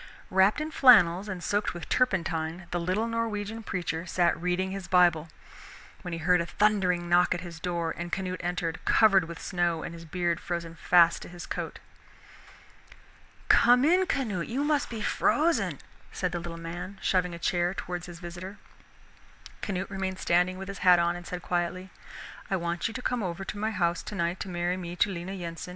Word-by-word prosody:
Wrapped 190 +6 +4
in 310 +1 -3
flannels 205 - +6
and 180 -3 -5
soaked 205 0 -1
with 175 - -7
turpentine, 170 -7 0
the 175 - -1
little 185 +6 0
Norwegian 225 -1 -3
preacher 180 -4 -3
sat 175 -1 +2
reading 180 +1 0
his 195 -1 -6
Bible, 170 -3 +3 0.7
when 180 - -6
he 165 - -3
heard 175 +2 +3
a - - -2
thundering 185 -5 +1
knock 175 +1 +4
at 175 - -5
his 170 -2 -9
door, 170 -2 -2
and 175 0 -6
Canute 185 0 -3
entered, 175 -1 -3
covered 195 -5 +5
with 170 0 -8
snow 175 -2 -1
and 170 - -6
his 165 0 -10
beard 170 +1 -1
frozen 170 -1 -4
fast 170 0 +4
to - - -9
his 175 0 -9
coat. - - -5 1.7
"Come 245 +3 +6
in, 365 +4 +4
Canute, 225 - -1
you 265 +5 -1
must 295 -1 +1
be 225 -3 -5
frozen," 325 +2 +1 0.3
said 180 -2 -2
the 175 - -3
little 170 0 -7
man, 175 +4 -7
shoving 180 -2 0
a - - -7
chair 175 +1 0
towards 175 -2 -5
his 175 -1 -9
visitor. 175 +4 -8 1.0
Canute 195 -1 -3
remained 190 -1 -3
standing 180 +1 +1
with 195 0 -7
his 195 0 -7
hat 180 -2 +6
on 170 0 +1
and 175 0 -9
said 180 -1 -6
quietly, 180 +1 -2 0.6
"I 195 - +1
want 170 +1 -1
you 225 - -6
to 255 - -4
come 245 -2 -1
over 185 0 -4
to 205 - -6
my 215 +1 0
house 175 -5 0
tonight 175 -3 -2
to 195 - -5
marry 175 +1 -1
me 175 -1 -6
to 200 +3 +2
Lena 180 +1 -5
Yensen." 170 -2 -6
180 Hz, 190 wpm, -28 LUFS, 170-195 Hz, 1.7 s, flannels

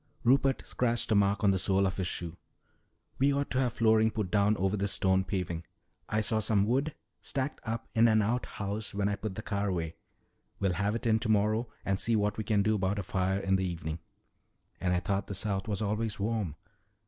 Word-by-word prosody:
Rupert 135 +2 +3
scratched 120 -2 0
a - - +5
match 100 0 +3
on 100 -2 +4
the 95 - +1
sole 95 +2 +2
of 95 - -1
his 95 -2 -1
shoe. 85 -2 -5 0.8
"We 140 +2 +4
ought 140 0 -1
to 130 - +1
have 125 -3 +1
flooring 110 -1 +4
put 110 -4 -3
down 105 0 +3
over 95 +2 +1
this 100 0 -1
stone 95 0 +2
paving. 90 -4 -3 0.5
I 110 0 +1
saw 110 0 +1
some 105 -2 +2
wood 135 +7 0 0.3
stacked 135 +1 -3
up 115 +1 -3
in 115 +1 +5
an 110 -1 +4
outhouse 105 -2 -3
when 100 0 +1
I 100 - 0
put 105 -1 -5
the 110 - -6
car 100 -1 -1
away. 85 -3 -2 0.7
We'll 95 -2 +1
have 100 +4 0
it 115 - -4
in 110 -1 +3
tomorrow 110 +1 +1 0.2
and 95 -1 0
see 115 - +2
what 105 0 0
we - - -1
can 105 -2 +2
do 110 - +2
about 100 -1 0
a 100 - -2
fire 95 +1 0
in 95 0 +2
the 95 0 -1
evening." 80 -2 -5 0.8
"And 90 - 0
I 90 0 +1
thought 100 +1 -1
the 100 - -4
South 95 0 -1
was 105 -1 -1
always 110 +1 -1
warm." 105 -6 -1
105 Hz, 215 wpm, -30 LUFS, 95-110 Hz, 0.8 s, a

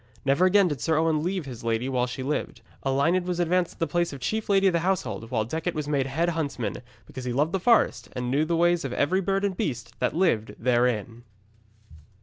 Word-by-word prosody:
Never 140 +7 +3
again 195 +1 +5
did 145 -6 -3
Sir 160 -2 +1
Owen 160 -1 +2
leave 180 0 -2
his 125 -4 -8
lady 115 +2 0
while 125 -2 0
she 130 +1 -5
lived. 145 +3 -3 0.2
Elined 145 +7 +2
was 180 -1 -2
advanced 175 +1 +1
to - - -24
the 165 - 0
place 175 +2 0
of 140 - -8
Chief 215 - -2
Lady 195 -1 +4
of 190 - +4
the 170 - +2
Household, 175 -10 -2
while 110 -4 0
Decet 160 +8 -3
was 150 -1 -3
made 140 -3 0
Head 165 +6 0
Huntsman, 145 -8 -3 0.3
because 130 -1 -8
he 125 - -2
loved 150 +5 +1
the 195 - 0
forest, 230 +5 +2
and 125 0 -3
knew 145 +3 +2
the 165 +2 0
ways 175 0 +3
of 135 -3 -4
every 185 +9 +1
bird 195 +1 0
and 195 -2 -1
beast 120 -8 -3
that - - 0
lived 160 - +1
therein. 120 -1 0
155 Hz, 225 wpm, -26 LUFS, 125-175 Hz, 0.3 s, again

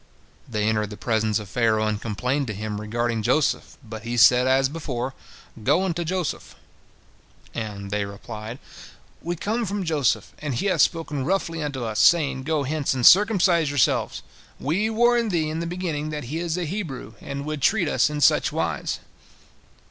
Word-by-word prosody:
They 105 -3 -1
entered 105 -1 0
the 105 - -8
presence 110 -2 0
of 105 -2 -6
Pharaoh, 110 0 +1
and 105 -1 -1
complained 125 +6 -1
to 105 - -4
him 105 0 -4
regarding 115 +1 -1
Joseph, 130 +7 0
but 110 -2 -8
he 120 +1 -4
said 125 +2 +6
as 135 +1 +4
before, 135 -4 -4 0.5
"Go 150 - +3
unto 175 -2 -1
Joseph!" 175 -2 -3 1.0
And 100 -3 -5
they 105 0 0
replied, 110 +3 -8 0.6
"We 175 +1 -3
come 220 +7 -1
from 200 -1 -2
Joseph, 145 - 0
and 145 -4 -3
he 120 - -2
hath 185 -6 +2
spoken 155 -4 0
roughly 165 0 -1
unto 140 -4 -3
us, 110 -2 -2
saying, 140 -6 +4
Go 155 -2 0
hence 145 0 -1
and 125 -2 0
circumcise 185 -6 +5
yourselves! 145 -3 +1 0.4
We 190 +10 0
warned 240 0 +3
thee 160 -4 0
in 160 - -3
the 170 - -3
beginning 165 -4 -3
that 150 -1 -4
he 160 - -1
is 170 0 -2
a 180 - -2
Hebrew, 150 - -5
and 140 0 -5
would 155 -1 -4
treat 185 - +3
us 145 - +2
in 150 0 -4
such - - +4
wise." - - -2
140 Hz, 175 wpm, -24 LUFS, 115-170 Hz, 1.0 s, said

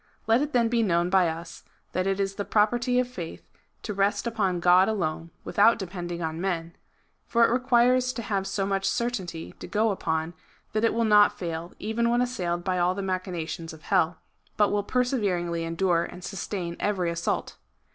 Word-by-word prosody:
Let 225 +3 +4
it 295 0 -1
then 240 -3 +3
be 235 0 +1
known 175 -4 +1
by 190 -2 +5
us 165 +1 -6 0.3
that 185 +1 -1
it 195 0 0
is 195 0 0
the 205 - -3
property 240 +5 +2
of 250 0 +2
faith 180 -10 -8 0.4
to 210 - -3
rest 200 +3 +1
upon 205 -6 0
God 180 +3 +5
alone, 165 -6 -2
without 225 +3 +4
depending 175 -3 -5
on 160 +1 -3
men; 170 -3 -2 0.5
for 235 0 +4
it - - +1
requires 250 0 +3
to 235 - -5
have 195 -2 -1
so 195 0 -1
much 195 0 -1
certainty 200 -10 -3
to - - -7
go 215 +1 +1
upon, 160 -3 -2 0.4
that 215 +1 0
it 230 - +2
will 230 0 +2
not 210 -1 +5
fail, 170 -1 -5
even 235 +2 0
when 240 +1 +2
assailed 180 -9 -1
by 185 -1 0
all 180 +1 +2
the 200 - -3
machinations 175 -3 -4
of 160 - -14
hell, 165 +2 +2 0.4
but 210 -1 +3
will 205 - +1
perseveringly 200 -9 0
endure 170 +1 +1
and 180 0 -10
sustain 180 -2 -4
every 185 -4 0
assault. 170 +1 -2
195 Hz, 185 wpm, -26 LUFS, 175-225 Hz, 0.5 s, by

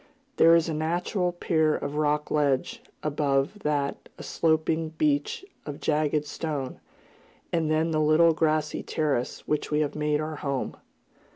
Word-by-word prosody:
There 165 +1 +7
is 165 0 +3
a 160 - -2
natural 175 +4 -1
pier 160 -3 +1
of 145 - -4
rocky 150 0 0
ledge, 150 - +1 0.2
above 145 +4 0
that 145 -5 -2
a - - -9
sloping 160 0 +1
beach 150 - 0 0.2
of 145 -1 -7
jagged 150 0 +1
stone, 145 -3 -4 0.7
and 160 -2 +1
then 160 +1 +1
the 155 -1 +1
little 155 +2 +5
grassy 155 -1 0
terrace 145 -6 -2
which 150 - -1
we 150 0 +1
have 145 - -1
made 150 0 0
our 155 0 -4
home. 140 -3 -3
155 Hz, 150 wpm, -27 LUFS, 150-160 Hz, 0.7 s, There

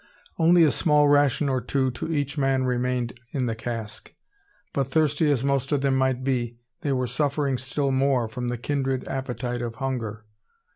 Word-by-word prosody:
Only 170 +1 +6
a 155 - +5
small 150 0 +3
ration 145 0 +3
or 130 -2 0
two 130 +1 0
to 125 +7 -5
each 145 -2 -1
man 135 -2 +1
remained 125 -1 -1
in 130 -3 0
the 115 - -1
cask; 115 -1 -6 0.6
but 135 -2 0
thirsty 150 +1 +2
as 135 -4 +1
most 140 -1 0
of 145 -2 +2
them 135 -1 +2
might 130 -1 +1
be, 120 -3 -1 0.2
they 145 - -1
were 130 -1 +1
suffering 140 +1 0
still 135 +1 -1
more 130 -3 +2
from 120 +3 -5
the 120 0 -2
kindred 135 +1 -2
appetite 125 -2 -3
of 115 -1 -4
hunger. 115 -5 -4
130 Hz, 180 wpm, -25 LUFS, 125-140 Hz, 0.6 s, Only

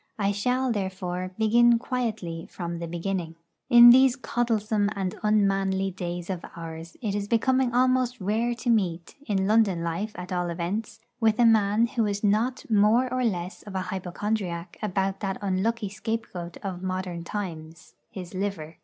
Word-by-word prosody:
I 200 -1 +1
shall, 250 +5 0
therefore, 185 -3 -3
begin 235 +2 +5
quietly 220 -10 -3
from 170 -1 -5
the 170 - -4
beginning. 170 -1 -3 0.3
In 240 0 +10
these 260 0 +6
coddlesome 220 -4 0
and 190 -2 -2
unmanly 195 -2 +1
days 175 -1 -5
of 180 -2 -5
ours 165 0 -8
it 210 -3 -1
is 205 0 -2
becoming 255 +3 +2
almost 255 0 +2
rare 220 +5 0
to 240 +1 -4
meet, 180 -6 0
in 195 -3 +1
London 205 -5 +3
life 175 +6 -3
at 180 0 -7
all 175 -1 -1
events, 180 +6 -4 0.2
with 220 -2 +3
a 240 - +5
man 220 0 +4
who 230 -2 0
is 205 0 -3
not 220 +5 +1
more 225 +4 +3
or 255 0 0
less 185 -4 -2
of 205 -2 -10
a 190 - 0
hypochondriac 180 -1 -3
about 195 -2 -1
that 195 -2 -3
unlucky 205 +3 -1
scapegoat 205 -4 -5
of 185 -3 -4
modern 185 -2 -3
times, 165 -4 -7 0.2
his 180 -2 -8
liver. 185 -5 -4
200 Hz, 160 wpm, -26 LUFS, 180-225 Hz, 0.3 s, In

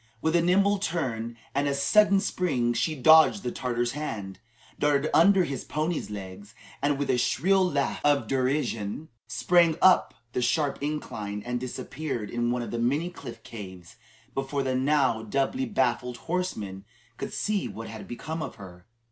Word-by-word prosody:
With 160 +5 0
a 170 - +5
nimble 195 +3 +3
turn 120 - -3 0.2
and 145 0 +1
a 140 - 0
sudden 200 +8 +4
spring, 140 - 0
she 135 +7 0
dodged 160 +7 +6
the 125 - -2
Tartar's 120 -1 -1
hand, 105 -10 -5 0.4
darted 145 +1 +2
under 190 +3 +6
his 140 -5 -4
pony's 155 -2 -2
legs, 100 0 -8 0.3
and 145 0 +1
with 145 - -2
a 125 - +1
shrill 190 +10 +2
laugh 145 -6 0
of 145 -1 +3
derision, 130 -1 -1 0.2
sprang 160 +8 +3
up 185 +1 +5 0.2
the - - 0
sharp 140 +4 +1
incline, 105 -9 -4
and 120 0 -2
disappeared 130 -2 -5
in 120 0 0
one 120 0 -1
of - - -6
the 120 - -2
many 145 +9 0
cliff 120 -9 -10
caves 95 -5 -10 0.4
before 135 +1 -2
the 130 -1 -1
now 130 -3 +2
doubly 140 - -1
baffled 125 - 0
horsemen 110 - -3 0.3
could - - -5
see 205 -2 -1
what 115 +1 -7
had 110 - -9
become 155 +6 -5
of - - -5
her. 90 -3 -13
135 Hz, 165 wpm, -27 LUFS, 120-160 Hz, 0.4 s, dodged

